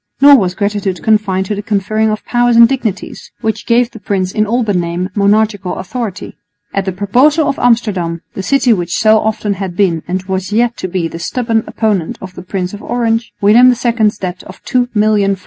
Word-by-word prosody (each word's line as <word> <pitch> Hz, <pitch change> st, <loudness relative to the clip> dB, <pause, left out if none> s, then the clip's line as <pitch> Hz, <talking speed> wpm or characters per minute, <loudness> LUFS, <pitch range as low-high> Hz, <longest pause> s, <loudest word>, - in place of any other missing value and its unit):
Nor 285 Hz, +1 st, +8 dB
was 180 Hz, -3 st, -1 dB
gratitude 200 Hz, -2 st, -2 dB
confined 205 Hz, -3 st, +1 dB
to 210 Hz, -, -3 dB
the 205 Hz, -, -4 dB
conferring 215 Hz, +1 st, 0 dB
of 215 Hz, 0 st, -3 dB
powers 240 Hz, -1 st, +2 dB
and 230 Hz, 0 st, +8 dB
dignities 230 Hz, -6 st, -4 dB
which 220 Hz, -2 st, -3 dB
gave 235 Hz, +1 st, +2 dB
the 225 Hz, -, -11 dB
prince 190 Hz, -2 st, -2 dB
in 215 Hz, +1 st, 0 dB
all 240 Hz, +3 st, +1 dB
but 205 Hz, -3 st, -1 dB
name 175 Hz, +1 st, -2 dB
monarchical 205 Hz, -1 st, +1 dB
authority. 205 Hz, 0 st, -5 dB, 0.4 s
At 195 Hz, -1 st, -1 dB
the 190 Hz, -, -1 dB
proposal 255 Hz, -, +2 dB
of -, -, -2 dB
Amsterdam, 195 Hz, -9 st, 0 dB
the -, -, -5 dB
city 255 Hz, +3 st, +2 dB
which 175 Hz, -3 st, -2 dB
so 220 Hz, 0 st, +4 dB
often 215 Hz, -1 st, -1 dB
had 190 Hz, -2 st, -5 dB
been 175 Hz, -5 st, +1 dB
and 185 Hz, +1 st, -2 dB
was 190 Hz, 0 st, -4 dB
yet 235 Hz, +2 st, +1 dB
to -, -, -4 dB
be 175 Hz, -2 st, -2 dB
the 165 Hz, -, -8 dB
stubborn 225 Hz, +4 st, -1 dB
opponent 205 Hz, -7 st, -1 dB
of 185 Hz, -1 st, -9 dB
the -, -, -9 dB
Princes 185 Hz, 0 st, -4 dB
of 205 Hz, -, -8 dB
Orange, 230 Hz, -1 st, -1 dB
William 220 Hz, +5 st, +6 dB
II's 235 Hz, -3 st, +1 dB
debt 185 Hz, -1 st, -5 dB
of 185 Hz, -, -13 dB
2,000,000 215 Hz, -5 st, +1 dB
fl. -, -, -23 dB
210 Hz, 200 wpm, -14 LUFS, 190-230 Hz, 0.4 s, Nor